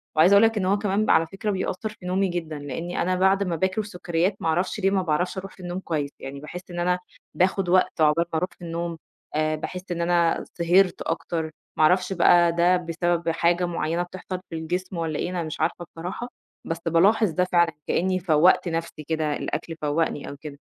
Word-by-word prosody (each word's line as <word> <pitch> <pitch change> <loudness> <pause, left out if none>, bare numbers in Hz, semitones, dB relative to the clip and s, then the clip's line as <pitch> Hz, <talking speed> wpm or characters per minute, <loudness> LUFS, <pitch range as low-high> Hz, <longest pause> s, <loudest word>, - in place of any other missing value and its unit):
وعايزة 165 +5 +6
أقول 200 +2 +7
لك 225 -1 +3
إن 190 - 0
هو 195 +2 +3
كمان 205 +1 0
بقى - - +5
على 160 0 +3
فكرة 195 +4 -3
بيأثّر 190 +2 -2
في 210 -4 -13
نومي 190 +2 +1
جدًا، 165 -4 -4
لإنّي 155 +5 -4
أنا 185 +2 +1
بعد 190 +2 +3
ما 175 -3 -1
باكل 190 +5 0
سكّريّات، 180 -1 -1
ما - - -1
أعرفش 180 +6 0
ليه 195 -1 +2
ما 195 -1 +2
باعرفش 180 +3 -1
أروح 190 0 -6
في - - -22
النوم 175 0 -4
كويس 150 -6 -2
يعني، 135 +1 -7
باحسّ 150 +5 -8
إن 175 - -5
أنا 180 +1 +1 0.3
باخد 185 0 +1
وقت 185 -2 +2
عقبال 155 +2 +4
ما 160 - +2
أروح 180 - -1
في - - -28
النوم، 170 0 -3 0.4
آآ 155 0 +1
باحس 180 +4 -6
إن 170 -1 -2
أنا 170 -1 +2
سِهرت 180 +2 +3
أكتر، 165 0 -2 0.3
ما - - +4
أعرفش 180 +4 +3
بقى 175 -1 +5
ده 175 +2 +3
بسبب 170 0 -1
حاجة 170 +2 +2
معيّنة 170 0 -1
بتحصل 185 +1 -6
في 165 - -6
الجسم 180 +3 -3
والّا 160 -2 -2
إيه، - - -1
أنا 180 -2 -2
مش 155 - -6
عارفة 175 +1 -1
بصراحة، 180 +9 -5 0.4
بس 165 - -2
بالاحظ 200 +6 +4
ده 180 +3 +1
فعلًا، 170 -2 +2
كإنّي 185 +1 +1
فوّقت 175 +1 +4
نَفْسي 165 -2 -4
كده، 155 -2 0
الأكل 165 - -4
فوّقني 150 0 -1
أو 140 - -8
كده، 145 -1 -9
175 Hz, 210 wpm, -25 LUFS, 165-185 Hz, 0.4 s, أقول